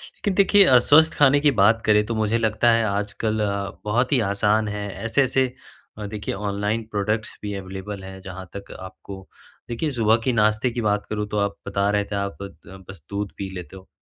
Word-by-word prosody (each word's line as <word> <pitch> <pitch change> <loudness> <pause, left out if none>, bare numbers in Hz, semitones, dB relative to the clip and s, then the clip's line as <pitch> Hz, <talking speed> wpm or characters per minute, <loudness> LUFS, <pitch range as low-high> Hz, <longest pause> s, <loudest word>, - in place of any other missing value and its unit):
लेकिन 200 - -2
देखिए 200 0 +6
अ, 130 - +6
स्वस्थ 155 +6 +5
खाने 145 0 +5
की 145 -1 +4
बात 110 +3 +4
करें 105 -1 +4
तो 115 +1 -3
मुझे 110 +1 +1
लगता 110 +1 +2
है 115 0 +3
आजकल 105 +2 -2 0.5
बहुत 120 +5 +1
ही 135 - +3
आसान 105 +2 +1
है 105 0 -4 0.2
ऐसे-ऐसे 130 +1 +1 0.6
देखिए 105 -1 -4
ऑनलाइन 105 +2 -2
प्रोडक्ट्स 105 +1 -2
भी 105 -1 -4
अवेलेबल 95 +1 -7
हैं। 95 0 -9
जहाँ 95 -1 -9
तक 100 0 -8
आपको 95 +1 -10 0.4
देखिए 120 +6 -2
सुबह 115 -3 +3
के 130 - +1
नाश्ते 110 +2 +2
की 120 0 -3
बात 105 -1 0
करूँ 105 -1 -2
तो 105 - -3
आप 100 -1 0
बता 100 0 0
रहे 105 0 +1
थे - - -1
आप 100 0 -3
बद 95 -1 -11
बस 95 -6 -11
दूध 100 0 -3
पी 100 -1 -5
लेते 90 +1 -8
हो। 95 0 -13
105 Hz, 195 wpm, -23 LUFS, 100-115 Hz, 0.6 s, देखिए